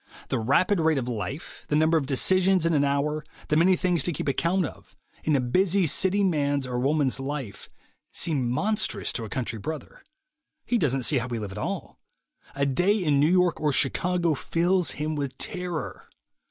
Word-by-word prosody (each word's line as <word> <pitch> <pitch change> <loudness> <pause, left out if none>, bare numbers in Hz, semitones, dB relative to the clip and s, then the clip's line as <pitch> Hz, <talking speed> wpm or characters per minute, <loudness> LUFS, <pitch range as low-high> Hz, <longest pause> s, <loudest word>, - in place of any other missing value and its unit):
The - - 0
rapid 170 - +2
rate 160 -2 +2
of 125 -2 -2
life, 125 +6 -5
the 150 - 0
number 160 +2 +3
of 145 -4 +1
decisions 185 +5 +2
in 165 - +2
an 145 -2 +3
hour, 145 +2 0 0.3
the 150 - +2
many 180 +4 +5
things 175 -4 0
to 175 - +1
keep 145 - -4
account 170 +6 +1
of, - - -11 0.3
in 155 - +2
a - - +3
busy 180 +9 +2
city 190 +6 +1
man's 145 -6 +1
or 125 -1 -3
woman's 140 0 +1
life, 135 -6 -5 0.4
seem 140 -7 -1
monstrous 205 - -1
to 115 - -3
a - - -8
country 115 -2 -3
brother. 155 +4 -7 0.6
He 240 - +1
doesn't 135 - +1
see 140 +2 +2
how 120 - -4
we 120 -2 -3
live 105 -3 -5
at 100 - -7
all. 185 - -5 0.6
A 140 0 +1
day 180 +10 +2
in 150 -8 +2
New 150 +3 +4
York 180 -3 +2
or 150 -1 +2
Chicago 170 +5 +1
fills 175 +3 +1
him 155 +1 -2
with 140 -3 -4
terror. 180 -5 -5
150 Hz, 190 wpm, -26 LUFS, 135-180 Hz, 0.6 s, many